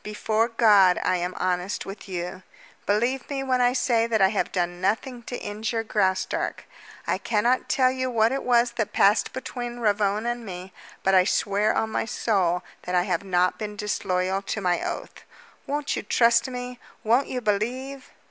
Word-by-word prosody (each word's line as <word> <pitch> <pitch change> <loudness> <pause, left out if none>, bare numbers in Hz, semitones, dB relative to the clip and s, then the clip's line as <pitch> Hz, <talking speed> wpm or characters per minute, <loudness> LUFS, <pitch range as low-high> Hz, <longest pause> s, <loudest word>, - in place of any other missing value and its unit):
"Before 215 +1 0
God, 210 -6 +5
I 185 - +2
am 180 +1 -3
honest 180 +1 -1
with 195 +1 -9
you. 180 +1 -5 0.5
Believe 240 +5 0
me 275 -2 -2
when 255 -1 +1
I 245 0 +3
say 240 -3 +2
that 225 -2 +1
I 190 -1 +5
have 205 - -1
done 175 -1 -2
nothing 235 +6 -1
to 245 - -4
injure 220 +2 -3
Graustark. 190 -4 -1 0.4
I - - 0
cannot 235 +3 +1
tell 255 -1 +3
you 260 0 -2
what 225 -1 +2
it 270 - -1
was 240 -1 +3
that 215 -3 -1
passed 200 0 +3
between 245 -2 -6
Ravone 210 -1 +1
and 240 0 -2
me, 185 -2 -8 0.3
but 195 - +2
I 185 -1 +6
swear 205 +1 +1
on 220 0 0
my - - -1
soul 185 -6 0 0.2
that 180 - -3
I 175 - +3
have 180 -1 -1
not 180 -1 +1
been 210 -1 -5
disloyal 190 -2 -1
to 200 - -4
my 180 -3 0
oath. - - -6 0.4
Won't 290 +1 -1
you - - -2
trust 230 +3 +3
me? 250 -1 -6 0.2
Won't 240 +5 +3
you 255 - -3
believe?" 250 +5 -2
215 Hz, 180 wpm, -25 LUFS, 190-245 Hz, 0.5 s, I